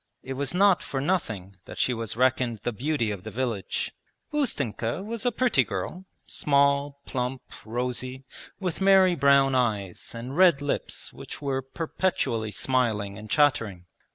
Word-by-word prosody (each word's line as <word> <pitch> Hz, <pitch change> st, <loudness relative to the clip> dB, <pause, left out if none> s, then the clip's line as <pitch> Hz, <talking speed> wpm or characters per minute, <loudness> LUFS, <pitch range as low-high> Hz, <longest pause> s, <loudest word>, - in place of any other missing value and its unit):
It 135 Hz, -, -4 dB
was 135 Hz, 0 st, -2 dB
not 195 Hz, -1 st, +5 dB
for 135 Hz, -, -3 dB
nothing 110 Hz, -, -2 dB
that -, -, -10 dB
she 125 Hz, -, +2 dB
was 115 Hz, -2 st, -4 dB
reckoned 125 Hz, -3 st, +2 dB
the 120 Hz, -, 0 dB
beauty 120 Hz, -1 st, -1 dB
of 100 Hz, -3 st, -5 dB
the -, -, -7 dB
village. 120 Hz, -6 st, -2 dB, 0.4 s
Ustenka 140 Hz, -, -1 dB
was 230 Hz, +2 st, -2 dB
a -, -, +3 dB
pretty 240 Hz, -, +3 dB
girl, 105 Hz, -, -5 dB, 0.2 s
small, 140 Hz, 0 st, +2 dB
plump, 125 Hz, 0 st, -3 dB, 0.2 s
rosy, 125 Hz, +3 st, -3 dB, 0.4 s
with 185 Hz, -2 st, -3 dB
merry 190 Hz, -1 st, +6 dB
brown 140 Hz, -3 st, +4 dB
eyes, 105 Hz, -7 st, -1 dB
and 125 Hz, +4 st, -6 dB
red 175 Hz, -5 st, +6 dB
lips 145 Hz, 0 st, -3 dB
which -, -, -8 dB
were 135 Hz, -2 st, -1 dB
perpetually 135 Hz, -5 st, -1 dB
smiling 105 Hz, -2 st, 0 dB
and 105 Hz, +1 st, -10 dB
chattering. 125 Hz, -, +2 dB
130 Hz, 150 wpm, -27 LUFS, 115-150 Hz, 0.4 s, merry